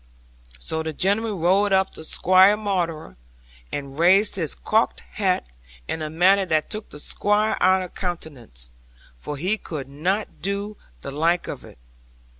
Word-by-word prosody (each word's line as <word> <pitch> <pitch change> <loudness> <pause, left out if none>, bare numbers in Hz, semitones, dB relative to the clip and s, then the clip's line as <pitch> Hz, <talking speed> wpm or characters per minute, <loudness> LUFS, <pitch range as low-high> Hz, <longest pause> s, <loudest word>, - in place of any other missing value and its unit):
'So 160 - -3
the 160 0 -4
gentleman 205 +4 0
rode 195 +5 +3
up 190 0 +3
to - - -9
Squire 185 +5 +5
Maunder, 175 - -3 0.5
and 140 0 -6
raised 190 +5 +5
his 165 -6 -1
cocked 220 +1 0
hat 190 -3 0 0.4
in 160 - -3
a 155 - -3
manner 185 +5 +4
that 160 -4 0
took 215 0 -5
the - - -10
Squire 210 +7 +1
out 185 +1 +4
of 180 - -9
countenance, 135 - -6 0.5
for 145 - -6
he 190 +8 0
could 145 -6 -6
not 180 +10 -2
do 200 +2 -2 0.3
the 140 - -6
like 165 +5 +1
of - - -6
it. - - -14
180 Hz, 155 wpm, -23 LUFS, 155-200 Hz, 0.5 s, Squire